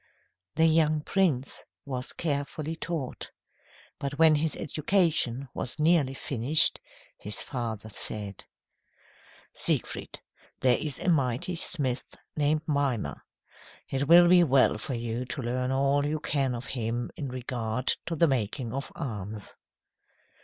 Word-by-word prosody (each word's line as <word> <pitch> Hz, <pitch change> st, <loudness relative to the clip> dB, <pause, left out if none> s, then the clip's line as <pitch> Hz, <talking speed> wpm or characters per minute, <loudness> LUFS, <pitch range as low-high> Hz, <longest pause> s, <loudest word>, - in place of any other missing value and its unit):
The 160 Hz, -, +4 dB
young 155 Hz, -1 st, +3 dB
prince 150 Hz, -7 st, 0 dB, 0.2 s
was 130 Hz, -2 st, -4 dB
carefully 150 Hz, +1 st, -2 dB
taught. 160 Hz, -5 st, -4 dB, 0.7 s
But 140 Hz, +1 st, -4 dB
when 160 Hz, -1 st, +7 dB
his 155 Hz, 0 st, 0 dB
education 150 Hz, -5 st, +1 dB
was 125 Hz, -, -5 dB
nearly 155 Hz, -4 st, +3 dB
finished, 135 Hz, +4 st, +3 dB, 0.4 s
his 105 Hz, 0 st, -3 dB
father 115 Hz, -5 st, -4 dB
said: 105 Hz, -2 st, -3 dB, 1.1 s
"Siegfried, -, -, -1 dB, 0.4 s
there 125 Hz, -2 st, +3 dB
is 150 Hz, -4 st, -2 dB
a -, -, -5 dB
mighty 140 Hz, 0 st, +1 dB
smith 140 Hz, -7 st, -3 dB, 0.2 s
named 150 Hz, +1 st, +1 dB
Mimer. 135 Hz, -, -1 dB, 0.7 s
It 135 Hz, +1 st, -1 dB
will 175 Hz, +2 st, +8 dB
be 175 Hz, 0 st, +7 dB
well 135 Hz, -4 st, +4 dB
for 135 Hz, -, -3 dB
you 115 Hz, +1 st, -3 dB
to 130 Hz, +2 st, -5 dB
learn 125 Hz, +2 st, -1 dB
all 140 Hz, +2 st, +2 dB
you 150 Hz, +2 st, -1 dB
can 135 Hz, -4 st, 0 dB
of 120 Hz, +2 st, -6 dB
him 120 Hz, -1 st, -3 dB
in 140 Hz, -, -4 dB
regard 125 Hz, -1 st, -1 dB
to 165 Hz, -, -2 dB
the 170 Hz, -, +4 dB
making 120 Hz, -2 st, -1 dB
of 135 Hz, +2 st, -4 dB
arms." 105 Hz, -, -6 dB
135 Hz, 130 wpm, -28 LUFS, 120-155 Hz, 1.1 s, will